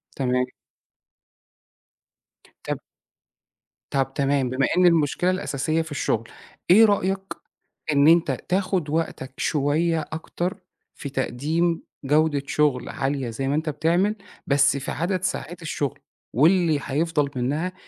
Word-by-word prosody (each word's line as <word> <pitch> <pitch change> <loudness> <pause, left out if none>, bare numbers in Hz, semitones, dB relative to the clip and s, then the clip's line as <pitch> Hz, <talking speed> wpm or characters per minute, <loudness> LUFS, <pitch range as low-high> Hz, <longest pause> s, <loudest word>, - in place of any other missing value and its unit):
تمام. 125 -1 +1 2.2
طَب - - -2 1.1
طَب 135 -1 0
تمام، 140 -2 +1
بما 130 +1 +1
إن 180 - +5
المشكلة 170 +1 +3
الأساسية 160 -2 -1
في 160 -1 -8
الشغل، 115 -5 -1 0.4
إيه 220 +5 +8
رأيك 195 -2 +1 0.7
إن 140 +1 +4
أنت 170 +1 +5 0.2
تاخد 185 -4 0
وقتك 150 -4 -2
شوية 160 +3 +1
أكتر 175 +4 -3 0.4
في 140 - -6
تقديم 155 +6 -1 0.2
جودة 150 0 +2
شغل 145 -5 +1
عالية 135 -2 -2
زي 135 +4 -3
ما 140 - +1
أنت 155 0 -1
بتعمل، 170 +8 +1 0.3
بس 140 0 +3
في 140 - -4
عدد 180 +3 -1
ساعات 180 -2 -3
الشغل، 145 -3 -3 0.3
واللي 160 - +4
حيفضل 150 +1 0
منها 150 +9 -1
150 Hz, 120 wpm, -24 LUFS, 140-170 Hz, 2.2 s, إيه